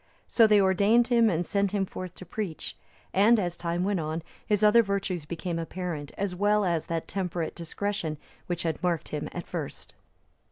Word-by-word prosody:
So 225 -2 +5
they 210 -1 +6
ordained 200 +5 +4
him 235 -2 +5
and 175 -2 0
sent 200 +1 0
him 200 -2 +1
forth 185 -1 -7
to 185 - -10
preach; 180 -2 -4 0.4
and, 215 +4 +5
as 175 -3 -1
time 170 +1 -2
went 200 -1 +1
on, 160 +1 -3 0.2
his 210 -1 +1
other 210 +2 +7
virtues 200 -6 -2
became 170 +1 -3
apparent, 165 -3 -4
as 200 -2 -1
well 205 +2 +2
as 170 -3 0
that 165 -1 -2
temperate 180 -4 -2
discretion 170 -2 -3 0.3
which 175 -1 -2
had 165 -2 -2
marked 175 -3 0
him 150 -1 -3
at 175 - -6
first. 160 -6 -6
180 Hz, 185 wpm, -28 LUFS, 170-205 Hz, 0.4 s, other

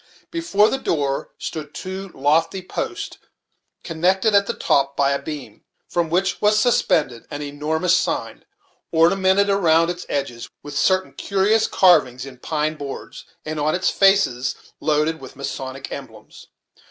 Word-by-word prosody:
Before 270 -12 +2
the 270 - -1
door 140 - -1
stood 150 -2 -6
two 190 +1 -6
lofty 165 +6 +1
posts, - - -5 0.6
connected 185 +5 +1
at 200 0 +4
the - - -2
top 140 0 +1
by 140 -1 +3
a 140 - -1
beam, 140 -9 -8 0.2
from 170 -2 -1
which 185 +3 0
was 210 0 +4
suspended 155 - +1
an 145 +1 -5
enormous 155 +5 0
sign, - - -2 0.5
ornamented 190 +4 +4
around 170 -4 +3
its 175 0 -8
edges 130 -4 -3
with 145 -1 -8
certain 185 +5 +1
curious 205 +3 +1
carvings 140 -9 +3
in 130 -2 -11
pine 155 +2 -2
boards, 140 -2 -8 0.2
and 155 0 -4
on 155 +2 +1
its 185 - +1
faces 195 -11 +3 0.2
loaded 155 +1 0
with 130 +1 -11
Masonic 135 -1 -6
emblems. 110 -6 -10
160 Hz, 140 wpm, -21 LUFS, 140-190 Hz, 0.6 s, at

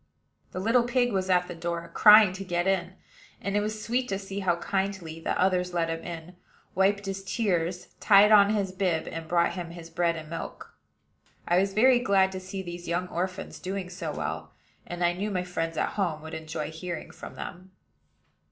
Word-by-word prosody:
The - - -5
little 230 +6 +3
pig 245 0 +1
was 190 -1 -1
at 180 -1 +3
the 180 - -6
door, 170 0 -4
crying 210 -2 +8
to 190 +1 -6
get 175 -2 -1
in; 185 -2 0 0.5
and 200 0 -3
it - - +4
was 215 +1 -3
sweet 250 +2 0
to 195 - -1
see 195 0 -6
how 185 -3 +2
kindly 190 -3 -3
the - - -2
others 180 -1 +1
let 165 -1 +1
him 165 0 -4
in, 170 +1 -8 0.4
wiped 200 +1 +2
his 195 0 -4
tears, 180 -5 -1
tied 205 0 +6
on 205 -1 +7
his 205 -3 0
bib, 185 -4 -1
and 165 0 -6
brought 170 +1 +2
him 175 -2 -5
his 170 -1 -10
bread 170 0 +1
and 160 -1 -7
milk. 165 +1 -7 0.7
I 175 +1 +4
was 195 +1 0
very 250 +3 +6
glad 195 -4 +3
to 190 - -5
see 190 +1 -6
these 175 -1 -8
young 180 +2 -1
orphans 185 +2 -4
doing 185 -1 -4
so 170 -3 -4
well, 80 - -5 0.3
and 175 0 -4
I 175 - +2
knew 200 +4 -3
my 185 -3 -1
friends 165 -2 -3
at - - +1
home 170 -7 -2
would 160 - -8
enjoy 155 -1 -5
hearing 170 +2 -6
from - - -10
them. 185 +1 -8
185 Hz, 200 wpm, -27 LUFS, 170-195 Hz, 0.7 s, crying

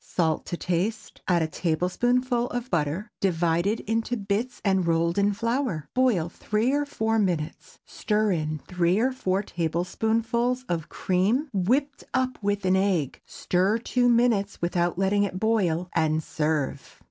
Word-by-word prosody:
Salt 160 -3 -1
to 175 - -3
taste; 185 +7 -2
add 175 -3 +3
a - - 0
tablespoonful 240 - 0
of 245 +1 -4
butter, 170 +6 -1
divided 175 +3 +1
into 225 +3 -1
bits 210 +4 -2
and 190 -3 +2
rolled 170 +1 +2
in 200 +1 +3
flour. 230 - -1
Boil 245 -11 +2
three 215 +7 -1
or 290 +1 0
four 225 -4 0
minutes; 175 -7 -2
stir 215 -1 0
in 155 -3 -1
three 180 0 +1
or 250 +4 +2
four 195 -6 -1
tablespoonfuls 220 +9 -1
of 165 -5 -3
cream 210 +11 0
whipped 260 +10 0
up 255 0 0
with 205 -1 -1
an 185 0 +4
egg, 190 -8 0
stir 190 +5 +1
two 245 +1 +1
minutes 230 -4 +2
without 175 0 0
letting 195 +2 +2
it 190 -2 -1
boil, 185 -6 +1
and 160 -1 +1
serve. 150 -3 -2
195 Hz, 145 wpm, -26 LUFS, 170-230 Hz, -, an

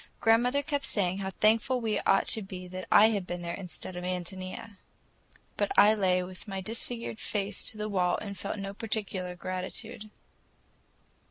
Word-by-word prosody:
Grandmother 245 +5 +4
kept 285 0 -1
saying 190 -2 +1
how 190 -1 -2
thankful 225 +6 +3
we 225 -3 0
ought 195 - +3
to 220 - +2
be 185 -2 -7
that 185 +1 -7
I 215 +2 +8
had 200 -5 -1
been 175 0 -4
there 170 0 -3
instead 180 -1 -4
of 180 - -5
Ántonia. 185 +3 -5 0.8
But 205 -1 +1
I 210 +2 +8
lay 185 -3 +2
with 185 +3 -9
my 195 -1 -3
disfigured 230 +3 -4
face 205 -1 -1
to 215 - -1
the 210 0 -2
wall 180 -4 +2
and 200 -2 -6
felt 200 +2 -4
no 195 0 -4
particular 200 -4 -3
gratitude. 185 +5 -5
200 Hz, 170 wpm, -30 LUFS, 185-220 Hz, 0.8 s, I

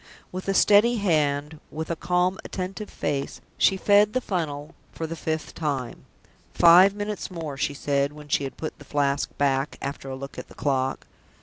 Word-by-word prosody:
With 185 +1 -6
a 195 - +1
steady 210 +5 +5
hand, 150 -6 0
with 160 +2 -5
a - - 0
calm, 180 +2 0
attentive 195 +3 -5
face, 140 -1 -3 0.2
she 195 - +4
fed 205 +2 +4
the 255 - +2
funnel 155 - -3 0.2
for 165 - -5
the 165 +1 -5
fifth 160 0 -3
time. 140 -6 -3 0.5
"Five 180 +4 +7
minutes 205 0 -4
more," 165 -6 -5
she 140 +1 -2
said, 140 0 0
when 150 0 -12
she 145 - +1
had 135 - -6
put 155 - -6
the - - -11
Flask 140 -1 0
back, 140 0 0
after 140 0 -5
a 130 - -4
look 140 +1 -8
at - - -8
the - - -16
clock. 135 -2 -1
155 Hz, 185 wpm, -25 LUFS, 140-185 Hz, 0.5 s, Five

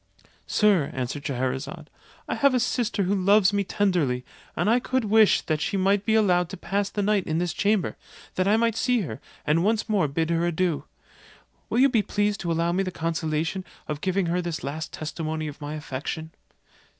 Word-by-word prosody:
"Sir," 200 -9 +3
answered 130 +3 -3
Scheherazade, 130 0 -3 0.4
"I - - -1
have 280 -2 +3
a - - +3
sister 235 -3 0
who 190 +2 +1
loves 200 +1 +4
me 200 0 +1
tenderly, 175 -11 0 0.3
and - - 0
I 235 +3 +4
could 255 -1 -1
wish 215 0 +5
that 155 -2 -2
she 200 - -1
might 195 +2 +2
be 220 - +3
allowed 180 -5 +3
to - - -7
pass 200 +2 -1
the 205 - -2
night 205 -2 +2
in 160 - 0
this 175 -1 -1
chamber, 205 -3 +1 0.4
that 185 +1 0
I 210 +2 +4
might 230 -1 +2
see 245 0 +2
her, 125 - -6 0.2
and 155 +3 +2
once 220 +2 +1
more 205 -8 +2
bid 160 +4 -1
her 165 0 +1
adieu. 175 -2 0 0.8
Will - - -1
you 265 +2 +6
be 240 -5 +2
pleased 205 0 0
to 170 - -2
allow 165 +1 +1
me 185 +3 +1
the 190 - -1
consolation 165 +1 -2 0.2
of 150 -1 -4
giving 190 0 0
her 175 +2 0
this 170 -3 -4
last 155 +3 -4
testimony 155 0 -4
of 150 0 -9
my 145 +1 -4
affection?" 155 +2 -5
180 Hz, 200 wpm, -25 LUFS, 155-205 Hz, 0.8 s, you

